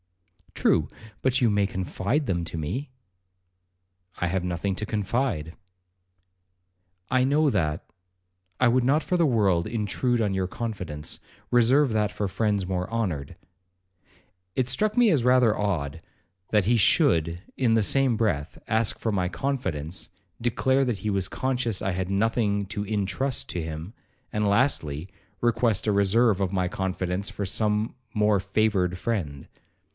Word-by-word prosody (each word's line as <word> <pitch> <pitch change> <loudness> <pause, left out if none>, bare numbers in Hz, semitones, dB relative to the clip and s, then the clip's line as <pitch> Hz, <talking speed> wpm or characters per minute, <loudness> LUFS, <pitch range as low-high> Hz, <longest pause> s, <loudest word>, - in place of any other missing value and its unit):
'True, - - +2 0.3
but 130 0 +2
you 120 - +4
may 100 -1 +2
confide 95 - -1
them 85 -6 -1
to 80 - -6
me.' 125 - -3 1.3
'I 90 - 0
have 95 +1 -1
nothing 90 +2 -2
to 105 - -4
confide.' 105 - -1 1.5
'I 130 0 +3
know 145 +3 +3
that,—I 90 - -3
would 125 +1 +3
not 140 +5 +3
for 180 - -1
the 170 - +3
world 100 - +2
intrude 115 +2 0
on 105 -3 +1
your 95 -1 0
confidence; 95 -10 -5 0.3
reserve 125 +2 +4
that 105 -1 +1
for 105 - -2
friends 100 -1 0
more 90 +1 -2
honoured.' 90 -12 -2 1.2
It 130 -1 0
struck 210 - 0
me 240 -2 +6
as 150 -10 +2
rather 125 -3 +4
odd, 80 -7 -2 0.5
that 105 -3 +2
he 120 +3 +3
should, 85 -4 +3 0.2
in 120 -4 +2
the 110 - +3
same 135 +2 +2
breath, 85 -11 -1
ask 110 0 +1
for 115 - -1
my 90 -3 0
confidence,—declare 120 - -2
that 120 -6 -1
he 105 - -2
was 100 -2 0
conscious 125 -3 -1
I 95 - 0
had 90 0 -2
nothing 100 0 +1
to 105 0 -3
intrust 105 +5 -1
to 85 - -3
him,—and, 105 +7 -6
lastly, 100 - +1 0.3
request 115 -3 +2
a - - +4
reserve 100 +1 +3
of 95 -1 -1
my 90 -1 +1
confidence 95 +1 -2
for 100 - -4
some 105 +2 +1 0.2
more 105 -1 +3
favoured 95 -2 +1
friend. 85 -10 -3
105 Hz, 140 wpm, -26 LUFS, 90-120 Hz, 1.5 s, me